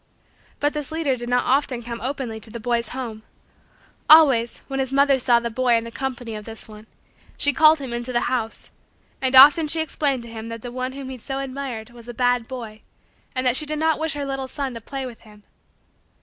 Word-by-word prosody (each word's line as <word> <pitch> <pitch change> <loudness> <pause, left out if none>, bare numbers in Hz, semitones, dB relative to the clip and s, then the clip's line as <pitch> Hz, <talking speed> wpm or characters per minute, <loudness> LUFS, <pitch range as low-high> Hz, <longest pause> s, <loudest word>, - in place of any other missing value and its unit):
But 290 +1 +1
this 300 -1 -4
leader 315 -5 0
did 240 -1 -7
not 245 0 +2
often 260 -2 0
come 235 0 -6
openly 255 -4 -4
to 220 - -4
the 235 +2 -7
boy's 235 0 0
home. 235 -4 -6 0.9
Always, 275 -7 +6
when 270 -1 -4
his 265 -1 -1
mother 275 0 +3
saw 240 -1 +4
the 235 0 -4
boy 245 +1 +2
in 230 - +1
the 230 - -8
company 245 -3 -5
of 210 -1 -7
this 225 +1 -7
one, 215 0 -13 0.5
she 285 - +3
called 315 +2 +6
him 265 -4 -6
into 240 +1 -4
the 240 - +1
house, 235 -3 -3 0.5
and 260 0 +1
often 295 +4 +8
she 320 +2 +4
explained 285 -5 -1
to 235 - -11
him 225 0 -7
that 230 -1 -7
the 245 - -6
one 255 +1 -4
whom 270 -1 -7
he 260 - -7
so 270 +4 -5
admired 260 -4 -5
was 240 -1 -14
a 240 - -8
bad 245 -1 +1
boy 230 -4 -8 0.5
and 255 0 -1
that 250 -1 +4
she 305 +2 +2
did 305 0 -2
not 320 0 +1
wish 320 0 -1
her 285 -1 -3
little 270 -1 -4
son 270 -1 -4
to 230 - -8
play 270 +3 -6
with 240 -3 -10
him. 210 -2 -18
255 Hz, 225 wpm, -22 LUFS, 235-275 Hz, 0.9 s, often